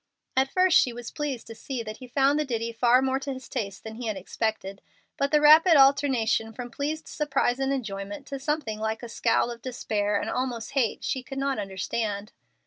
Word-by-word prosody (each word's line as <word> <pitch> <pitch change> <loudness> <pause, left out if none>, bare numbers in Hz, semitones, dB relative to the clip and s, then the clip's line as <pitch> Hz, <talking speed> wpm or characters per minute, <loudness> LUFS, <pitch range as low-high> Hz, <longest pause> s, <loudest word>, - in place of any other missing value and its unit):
At 265 +1 +2
first 370 -2 +5
she 250 - +2
was 240 0 -8
pleased 285 -5 -4
to 225 - -9
see 245 +1 -5
that 215 0 -7
he 255 - -11
found 275 +3 +2
the - - +2
ditty 230 -4 -2
far 245 +2 +4
more 265 0 +1
to 275 0 -4
his 260 -2 -9
taste 200 -2 -4
than 220 0 -8
he 240 -1 -5
had 215 -2 -2
expected. 195 0 -3 0.3
But 280 - 0
the 300 - +4
rapid 315 +3 +7
alternation 270 -5 +3
from 245 +1 -7
pleased 305 +5 -3
surprise 275 -4 0
and 270 0 0
enjoyment 205 -1 -4
to 275 -1 -6
something 275 -7 -2
like 220 +2 -2
a - - -5
scowl 235 +1 +1
of 235 -1 -9
despair 210 -5 -1
and - - -4
almost 250 -3 -3
hate 255 -6 0
she 260 - -1
could 270 +1 -8
not 275 -3 -1
understand. 200 +2 -3
245 Hz, 210 wpm, -26 LUFS, 220-275 Hz, 0.3 s, rapid